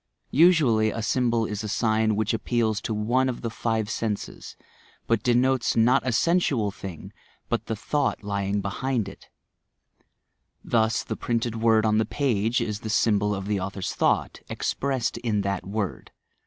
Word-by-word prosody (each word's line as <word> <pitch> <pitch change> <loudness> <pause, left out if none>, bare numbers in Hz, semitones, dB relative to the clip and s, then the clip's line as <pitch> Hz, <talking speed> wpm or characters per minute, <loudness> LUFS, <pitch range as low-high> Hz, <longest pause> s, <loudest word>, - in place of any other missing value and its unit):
Usually, 140 -10 +5
a 115 +1 -4
symbol 120 -1 +1
is 105 0 -4
a - - -3
sign 110 0 +1
which 110 +1 0
appeals 115 -1 0
to - - -4
one 120 +5 +1
of 125 - -5
the 115 - -3
five 110 -2 -1
senses, 110 -2 -4 0.5
but 115 -2 +1
de 120 0 +2
notes 130 0 +2
not 120 +3 +4
a - - +2
sensual 130 - +2
thing, 95 -4 -9 0.4
but - - -2
the 110 - -2
thought 145 +3 -1
lying 100 0 -1
behind 115 +2 -2
it. - - -12 1.3
Thus 110 0 +1
the - - -4
printed 115 -1 -2
word 110 -1 +4
on 110 0 +3
the 110 - +2
page 115 -3 0
is 105 -1 -2
the 110 - -6
symbol 105 -2 +2
of 95 -1 -5
the 100 -1 0
author's 95 0 -4
thought, - - 0
expressed 130 -4 -2
in 110 -4 0
that 100 -2 -3
word. 100 - -3
110 Hz, 165 wpm, -25 LUFS, 105-120 Hz, 1.3 s, Usually